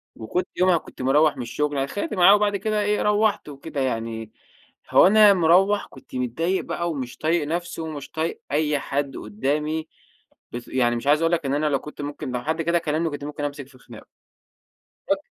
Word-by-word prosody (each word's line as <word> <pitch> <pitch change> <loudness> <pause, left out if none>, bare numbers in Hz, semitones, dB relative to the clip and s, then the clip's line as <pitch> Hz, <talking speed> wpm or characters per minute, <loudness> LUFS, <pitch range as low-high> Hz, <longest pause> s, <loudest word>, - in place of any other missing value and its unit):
وكنت 175 +12 -3
يومها 185 -1 +4
كنت - - -10
مروّح 150 +4 +3
من - - -4
الشغل، 150 +5 -2
أنا 135 - +1
اتخانقت 205 - -4
معاه 195 +1 +7
وبعد 205 -1 +1
كده 215 +1 -1
إيه، 210 0 +1
روّحت 210 -4 +1
وكده 145 0 -6
يعني، 115 -3 -3 0.6
هو - - +7
أنا 210 0 +7
مروّح 190 +4 +3
كنت 130 - -14
متضايق 160 +10 -1
بقى 170 0 -3
ومش 130 -5 -5
طايق 160 -1 0
نفْسي 175 +1 -3
ومش 155 -3 -7
طايق 160 +1 -3
أي 150 0 +1
حد 140 0 -3
قُدّامي، 150 +9 -2 0.7
بس 120 0 -7
يعني 120 -2 +1
مش 120 - -6
عايز 150 +2 +4
اقول 165 +1 +2
لك 165 -4 0
إن 135 - 0
أنا 150 +1 0
لو 140 -2 +1
كنت 150 -1 -9
ممكن 145 -3 -5
لو 125 -1 -3
حد 160 +3 -1
كده 170 +1 +2
كلّمني 160 0 -1
كنت 145 0 -6
ممكن 150 0 -5
أمسِك 145 -2 -5
في 135 -2 -19
خِناقُه. - - -14 1.1
أك - - +3
150 Hz, 195 wpm, -23 LUFS, 135-175 Hz, 1.1 s, معاه